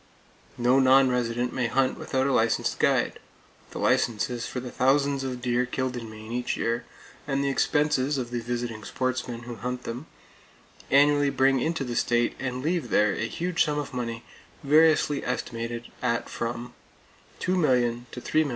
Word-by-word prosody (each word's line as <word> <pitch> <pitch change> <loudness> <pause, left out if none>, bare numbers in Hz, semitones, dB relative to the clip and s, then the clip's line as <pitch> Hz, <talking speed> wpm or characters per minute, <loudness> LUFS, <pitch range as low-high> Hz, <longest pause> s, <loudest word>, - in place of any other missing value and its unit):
No 125 +2 +4
non 135 0 +6
resident 120 0 -1
may 125 -2 0
hunt 130 +2 +1
without 130 0 -1
a 140 - +1
licensed 115 -1 +1
guide. - - +2 0.5
The - - -9
licenses 120 +1 +1
for 125 - -4
the 125 0 -7
thousands 140 +1 +2
of 125 -2 -4
deer 125 0 +1
killed 130 0 -2
in 115 -2 -6
Maine 110 +1 -10
each 125 +1 -2
year, 115 +1 -1 0.4
and 140 -1 0
the 140 - +1
expenses 145 -1 +1
of 120 -2 -4
the 120 - -1
visiting 120 -2 -4
sportsmen 125 -1 -3
who 120 -1 -8
hunt 125 +3 -4
them, 125 +7 -6 0.8
annually 145 +1 +5
bring 135 0 +3
into 160 +2 -1
the 120 -2 -4
state 120 0 +1
and 130 -1 -3
leave 160 -5 -1
there 105 -1 +3
a 115 - -2
huge 175 +6 0
sum 150 -2 -1
of 145 -2 -4
money, 115 -2 -4 0.4
variously 150 0 +4
estimated 120 -1 -4
at 115 0 -1
from 120 +1 -4 0.7
$2,000,000 125 -10 +1
to - - -7
$3,000,000. 155 +2 +1
125 Hz, 165 wpm, -26 LUFS, 120-140 Hz, 0.8 s, non